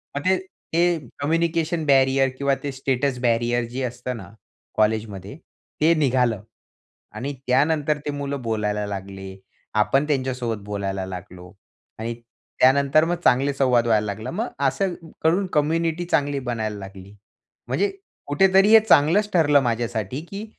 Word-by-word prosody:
मग 145 Hz, -, -2 dB
ते 185 Hz, 0 st, +4 dB, 0.4 s
ते 175 Hz, +1 st, +3 dB, 0.2 s
कम्युनिकेशन 165 Hz, +2 st, 0 dB
बॅरियर 135 Hz, -1 st, +4 dB
किंवा 140 Hz, 0 st, +1 dB
ते 145 Hz, -, -2 dB
स्टेटस 135 Hz, 0 st, -1 dB
बॅरियर 120 Hz, 0 st, +1 dB
जे 125 Hz, +3 st, -5 dB
असतं 125 Hz, 0 st, -4 dB
ना -, -, -10 dB, 0.5 s
कॉलेजमध्ये, 105 Hz, -1 st, -1 dB, 0.5 s
ते 160 Hz, +2 st, +5 dB
निघालं 125 Hz, -8 st, +1 dB, 0.7 s
आणि 140 Hz, +3 st, -4 dB
त्यानंतर 150 Hz, +3 st, +2 dB
ते 145 Hz, -, -1 dB
मुलं 140 Hz, -1 st, -4 dB
बोलायला 105 Hz, -2 st, -1 dB
लागले. 95 Hz, -1 st, -7 dB, 0.4 s
आपण 135 Hz, +7 st, +2 dB
त्यांच्यासोबत 130 Hz, -6 st, -2 dB
बोलायला 100 Hz, -2 st, -3 dB
लागलो 90 Hz, -1 st, -9 dB, 0.5 s
आणि 115 Hz, +1 st, -3 dB, 0.5 s
त्यानंतर 140 Hz, +4 st, +5 dB
मग 175 Hz, +1 st, 0 dB
चांगले 135 Hz, +3 st, +3 dB
संवाद 125 Hz, -3 st, +2 dB
व्हायला 110 Hz, -2 st, +2 dB
लागला. 105 Hz, +1 st, -5 dB
मग 220 Hz, +8 st, -2 dB, 0.2 s
असं 195 Hz, -2 st, -1 dB
क 165 Hz, -, -15 dB, 0.2 s
करून 180 Hz, +5 st, +2 dB
कम्युनिटी 165 Hz, +3 st, 0 dB
चांगली 145 Hz, -4 st, 0 dB
बनायला 110 Hz, -3 st, -3 dB
लागली. 95 Hz, 0 st, -11 dB, 0.5 s
म्हणजे 405 Hz, -, 0 dB, 0.4 s
कुठेतरी 190 Hz, +7 st, +4 dB
हे 225 Hz, -, +10 dB
चांगलंच 175 Hz, +8 st, +4 dB
ठरलं 145 Hz, -5 st, +4 dB
माझ्यासाठी 120 Hz, +1 st, -2 dB
की 200 Hz, +2 st, -6 dB
135 Hz, 135 wpm, -23 LUFS, 110-155 Hz, 0.7 s, हे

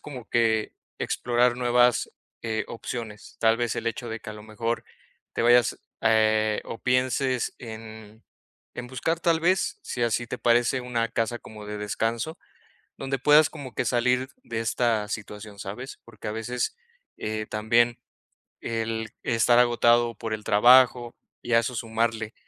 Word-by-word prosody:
como 130 Hz, -6 st, -9 dB
que 110 Hz, -2 st, +1 dB, 0.2 s
explorar 120 Hz, 0 st, +1 dB
nuevas, 125 Hz, -1 st, +3 dB, 0.3 s
eh, 110 Hz, -1 st, -2 dB
opciones, 115 Hz, -2 st, -7 dB
tal 115 Hz, 0 st, +4 dB
vez 120 Hz, -1 st, -1 dB
el 115 Hz, -, -4 dB
hecho 120 Hz, +1 st, -3 dB
de 115 Hz, 0 st, -4 dB
que -, -, -10 dB
a -, -, -6 dB
lo 105 Hz, -, -11 dB
mejor 115 Hz, +2 st, -3 dB, 0.5 s
te -, -, -1 dB
vayas, 120 Hz, 0 st, +4 dB, 0.2 s
eh, 110 Hz, -1 st, +3 dB
o 115 Hz, -, -7 dB
pienses 125 Hz, 0 st, 0 dB
en 110 Hz, -1 st, -10 dB, 0.5 s
en 125 Hz, -, -6 dB
buscar, 160 Hz, +6 st, -2 dB
tal 165 Hz, -1 st, +2 dB
vez, 185 Hz, +3 st, +1 dB
si 120 Hz, -, -4 dB
así 120 Hz, +1 st, 0 dB
te 125 Hz, -, -5 dB
parece, 120 Hz, +2 st, +2 dB
una 120 Hz, -2 st, -1 dB
casa 115 Hz, +2 st, -1 dB
como 105 Hz, -2 st, -11 dB
de 105 Hz, 0 st, -5 dB
descanso, 115 Hz, -, -2 dB, 0.6 s
donde 135 Hz, 0 st, -2 dB
puedas 150 Hz, +3 st, +5 dB
como 140 Hz, -5 st, -9 dB
que -, -, -1 dB
salir 125 Hz, +2 st, +1 dB, 0.2 s
de 115 Hz, -1 st, -3 dB
esta 115 Hz, -2 st, 0 dB
situación, 105 Hz, -1 st, -7 dB
¿sabes?, 105 Hz, +8 st, -7 dB
porque 115 Hz, -2 st, -9 dB
a -, -, -2 dB
veces, 120 Hz, -, -3 dB, 0.4 s
eh, 110 Hz, 0 st, -3 dB
también 115 Hz, +2 st, +2 dB, 0.6 s
el 115 Hz, -1 st, -3 dB
estar 120 Hz, +1 st, +3 dB
agotado 120 Hz, -1 st, +4 dB
por 110 Hz, -1 st, -4 dB
el 105 Hz, -1 st, -5 dB
trabajo 120 Hz, +2 st, +5 dB, 0.3 s
y 120 Hz, -, -3 dB
a 115 Hz, -, +7 dB
eso 125 Hz, +2 st, -2 dB
sumarle 115 Hz, 0 st, -1 dB
115 Hz, 155 wpm, -26 LUFS, 110-125 Hz, 0.6 s, a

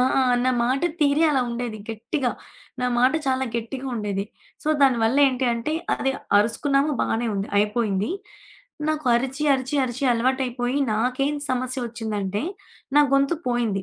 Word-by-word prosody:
ఆ! -, -, +5 dB, 0.4 s
నా 255 Hz, -, +3 dB
మాటతీరే 295 Hz, +3 st, +1 dB
అలా 270 Hz, -, +2 dB
ఉండేది 235 Hz, -2 st, -4 dB
గట్టిగా. 240 Hz, +4 st, -2 dB, 0.5 s
నా 250 Hz, -, +1 dB
మాట 255 Hz, +3 st, +4 dB
చాలా 265 Hz, 0 st, +1 dB
గట్టిగా 255 Hz, +4 st, -5 dB
ఉండేది. 205 Hz, -3 st, -2 dB, 0.4 s
సో, 305 Hz, -, -3 dB
దానివల్ల 240 Hz, -2 st, +3 dB
ఏంటి 260 Hz, 0 st, -2 dB
అంటే 235 Hz, +7 st, -3 dB, 0.2 s
అది 270 Hz, -, 0 dB, 0.3 s
అరుసుకున్నాము 275 Hz, +7 st, +1 dB
బానే 235 Hz, +2 st, 0 dB
ఉంది, 200 Hz, 0 st, -2 dB
అయిపోయింది. 210 Hz, -1 st, 0 dB, 0.8 s
నాకు 310 Hz, -3 st, -1 dB
అరిచి, 265 Hz, +4 st, -1 dB
అరిచి, 260 Hz, +2 st, -2 dB
అరిచి 255 Hz, +2 st, -3 dB
అలవాటైపోయి 250 Hz, +1 st, 0 dB
నాకేం 255 Hz, +6 st, 0 dB
సమస్య 255 Hz, -1 st, -1 dB
ఒచ్చిందంటే 210 Hz, -2 st, -3 dB, 0.5 s
నా 295 Hz, -, +8 dB
గొంతు 275 Hz, +4 st, +2 dB
పోయింది. 230 Hz, -5 st, 0 dB
250 Hz, 135 wpm, -24 LUFS, 225-270 Hz, 0.8 s, నా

